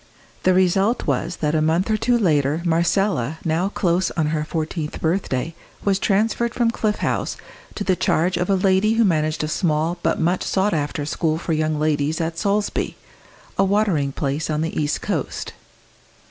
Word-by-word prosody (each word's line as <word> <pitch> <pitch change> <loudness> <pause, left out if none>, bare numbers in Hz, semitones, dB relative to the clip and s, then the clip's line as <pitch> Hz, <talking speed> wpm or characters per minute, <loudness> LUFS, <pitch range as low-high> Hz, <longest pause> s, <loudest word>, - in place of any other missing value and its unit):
The 185 0 +3
result 190 +5 +2
was 175 - -1
that 150 -1 +1
a 155 - +2
month 165 +7 +1
or - - +3
two 240 +3 +2
later 155 - +1
Marcella, 170 - +1
now 165 +4 +1
close 180 -2 +1
on 155 -2 -1
her 155 -1 0
fourteenth 155 0 -4
birthday, 165 -3 -1 0.3
was 195 -1 +2
transferred 225 +4 +1
from 235 -2 +2
Cliff 215 -2 0
House - - -1 0.4
to 205 - -3
the 190 -2 +2
charge 175 +2 +1
of 180 +2 -1
a 195 - +4
lady 190 +3 +3
who 230 0 +3
managed 155 -4 +1
a - - -1
small 160 +1 0
but - - 0
much 175 +3 +1
sought 200 +2 +1
after 150 -1 -2
school 155 +1 0
for 165 0 -2
young 155 0 0
ladies 150 0 0
at 165 0 -2
Solesby, 205 +1 0 0.6
a - - +6
watering 195 -8 +1
place 140 +3 -2
on 155 0 0
the 160 - -3
east 150 -1 -1
coast. - - -3
170 Hz, 175 wpm, -22 LUFS, 155-195 Hz, 0.6 s, a